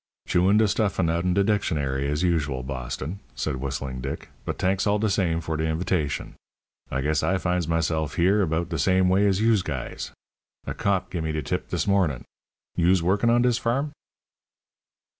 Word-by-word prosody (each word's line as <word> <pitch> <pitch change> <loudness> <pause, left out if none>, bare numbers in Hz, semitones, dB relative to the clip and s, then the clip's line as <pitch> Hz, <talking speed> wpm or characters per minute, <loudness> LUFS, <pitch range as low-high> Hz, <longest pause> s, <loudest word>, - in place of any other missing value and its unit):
"Chewin' 95 +4 +4
de 110 0 +4
stuffin' 100 -5 +1
out 85 +2 -1
'n 90 -1 +2
de 100 - +4
dictionary, 70 -10 0
as 75 +4 0
usual, 75 -7 0
Boston," 65 +6 -5 0.2
said 75 -4 -2
Whistling 65 -1 -4
Dick; 70 +1 -5 0.2
"but - - -3
t'anks 95 +2 +1
all 105 +1 +3
de 105 0 0
same 85 -4 +1
for 80 -1 -3
de 80 - 0
invitashun. 80 -2 -1 0.6
I 65 - -1
guess 75 +2 +1
I 95 - +1
finds 90 -3 -1
meself 80 -2 0
here 95 +4 +3
about 85 -1 0
de 85 -3 -2
same 95 +4 +3
way 100 +2 +4
as 95 0 +2
yous 110 -3 +4
guys. 65 -7 -5 0.6
A - - -3
cop 100 -2 0
gimme 80 -3 -2
de 75 -1 -2
tip - - -3
dis - - -1
mornin'. 90 -11 +1 0.5
Yous 90 +1 +3
workin' 100 +6 +2
on 120 +1 +4
dis 125 -1 +2
farm?" 135 +6 0
85 Hz, 180 wpm, -25 LUFS, 75-100 Hz, 0.6 s, Chewin